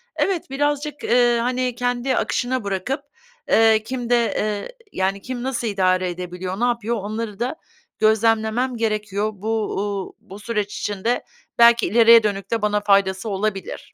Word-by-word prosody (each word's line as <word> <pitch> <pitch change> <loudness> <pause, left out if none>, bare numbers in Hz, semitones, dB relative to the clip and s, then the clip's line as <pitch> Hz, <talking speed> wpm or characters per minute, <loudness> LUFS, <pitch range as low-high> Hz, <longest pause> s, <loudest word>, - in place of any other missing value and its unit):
Evet, 365 -8 -1
birazcık, 290 +1 -2
eee, 240 0 +3
hani, 250 0 -1
kendi 245 +1 -1
akışına 255 -1 -1
bırakıp, 200 +8 -2 0.5
eee, 220 -1 +5
kimde, 245 0 -1 0.2
eee, 210 - -3 0.2
yani, 195 +1 -1
kim 250 +2 -5
nasıl 245 -3 -2
idare 185 -2 +1
edebiliyor, 180 +2 -5
ne 240 - +2
yapıyor, 235 -1 0
onları 215 0 -5
da 245 +5 -2 0.4
gözlemlemem 220 +3 +2
gerekiyor. 215 -1 -1
Bu, 210 +3 -5 0.3
uuu, 200 -1 -3
bu 210 -2 -12
süreç 210 -1 -3
içinde 210 +4 -1 0.4
belki 235 0 +6
ileriye 230 +2 +6
dönük 200 -2 -2
de 230 -2 0
bana 210 0 +1
faydası 195 0 +2
olabilir. 195 -1 -4
220 Hz, 140 wpm, -22 LUFS, 200-245 Hz, 0.5 s, belki